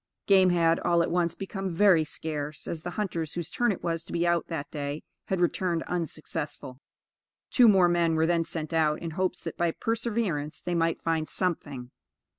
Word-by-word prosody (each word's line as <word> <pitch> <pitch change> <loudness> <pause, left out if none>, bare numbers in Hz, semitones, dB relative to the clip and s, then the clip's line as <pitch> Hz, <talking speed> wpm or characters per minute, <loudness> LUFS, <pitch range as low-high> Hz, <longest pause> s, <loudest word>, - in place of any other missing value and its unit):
Game 190 -2 +5
had, 165 -1 +3
all 170 -1 +2
at - - -2
once, 170 -1 +1
become 195 -2 -4
very 185 -4 +5
scarce, 150 -1 -4
as 165 - -4
the 175 - -5
hunters 170 -7 -2
whose 170 -2 -4
turn 240 -2 +2
it 190 - -5
was 165 -1 -1
to - - -10
be 170 0 0
out 170 -1 +1
that 145 -4 -5
day, 145 0 -4 0.2
had 190 - -1
returned 175 -1 0
unsuccessful. 155 -6 -5 0.7
Two 245 -3 +6
more 190 -4 +6
men 170 -1 +2
were 160 0 +3
then 170 0 +2
sent 160 0 -4
out, 155 -2 +2
in 165 - -5
hopes 185 +2 -2
that - - -6
by 170 0 +2
perseverance 215 -8 -2
they 175 - -3
might 165 -1 0
find 160 -1 0
something. 145 -9 -2
170 Hz, 190 wpm, -27 LUFS, 160-180 Hz, 0.7 s, Two